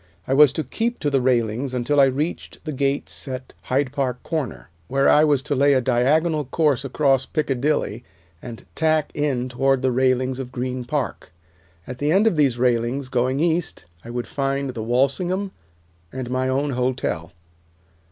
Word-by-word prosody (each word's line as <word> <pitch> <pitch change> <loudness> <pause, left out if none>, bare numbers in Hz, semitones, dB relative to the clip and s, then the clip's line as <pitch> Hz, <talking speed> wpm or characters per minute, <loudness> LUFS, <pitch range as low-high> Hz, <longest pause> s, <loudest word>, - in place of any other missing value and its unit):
I 130 - +1
was 145 0 +7
to 160 - -2
keep 230 - -2
to 145 - 0
the 135 -2 +2
railings 125 +1 0
until 125 +4 +1
I 140 - +8
reached 145 +7 -3
the 155 - -3
gates 140 +2 -2
at 130 -1 -6
Hyde 135 0 0
Park 130 -3 -2
Corner, 145 - -4 0.2
where 135 +1 +2
I 150 - +6
was 145 -3 +2
to 150 0 -2
lay 140 +1 +4
a 130 - +4
diagonal 150 +6 +2
course 145 -1 +1
across 135 -1 +1
Piccadilly, 135 -5 -1 0.4
and 120 -2 -9
tack 155 -1 +1
in 140 -4 -1
toward 135 +1 +1
the 130 - +2
railings 130 0 +1
of 125 -2 -6
Green 125 0 -3
Park. 135 -8 -3 0.5
At 125 0 -8
the 145 +1 +1
end 195 +5 +4
of 225 - +3
these 140 -6 +2
railings, 125 +2 0
going 130 +2 0
east, 165 - 0 0.2
I 115 - -10
would 120 0 -3
find 135 -1 -2
the 115 - -6
Walsingham, 155 - 0 0.6
and 130 -2 -5
my 130 0 0
own 140 +2 0
hotel. 125 -10 -2
135 Hz, 170 wpm, -22 LUFS, 125-145 Hz, 0.6 s, I